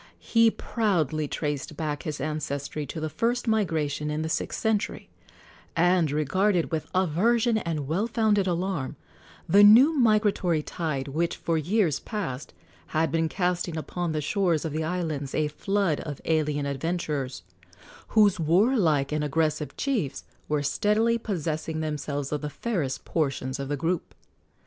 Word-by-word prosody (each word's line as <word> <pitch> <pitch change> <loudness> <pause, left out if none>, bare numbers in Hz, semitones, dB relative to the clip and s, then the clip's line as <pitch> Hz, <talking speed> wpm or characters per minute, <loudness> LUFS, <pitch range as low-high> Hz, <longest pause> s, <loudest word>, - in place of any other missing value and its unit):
He 230 -1 +3
proudly 165 - 0
traced 145 0 -3
back 150 -2 -2
his 150 -3 -4
ancestry 145 0 -3
to 160 - -5
the 155 - -2
first 235 +9 -1
migration 155 -9 0
in 150 +1 -2
the 160 - -3
sixth - - -2
century, 220 -2 -1 0.7
and 175 -1 +3
regarded 170 +5 +1
with 160 -2 -2
aversion 220 +7 +2
and 155 -7 -3
well 185 +9 0
founded 215 -4 +2
alarm 175 -5 -2 0.5
the 200 - +6
new 245 +10 +8
migratory 210 - +2
tide 150 -6 -3
which 165 +4 -1
for 165 - -1
years 170 0 +1
past 155 - -5 0.5
had 160 +1 +2
been 165 -1 +1
casting 175 -2 -1
upon 175 +2 -3
the 155 -1 -1
shores 170 0 +1
of 160 - -2
the 160 +1 -1
islands 155 -5 -3
a 155 -1 +1
flood 195 0 0
of 145 -3 -6
alien 150 -3 +1
adventurers, 140 - -3 0.6
whose 205 -4 +4
warlike 165 - +3
and 150 0 0
aggressive 155 0 -1
chiefs 235 - -1 0.3
were 150 -1 +1
steadily 220 +8 +2
possessing 160 -6 -3
themselves 150 -2 -3
of 150 - -2
the 150 - -3
fairest 155 - -3
portions 135 -3 -1
of 140 0 -4
the 145 - -1
group. 165 +4 -2
160 Hz, 145 wpm, -26 LUFS, 150-200 Hz, 0.7 s, new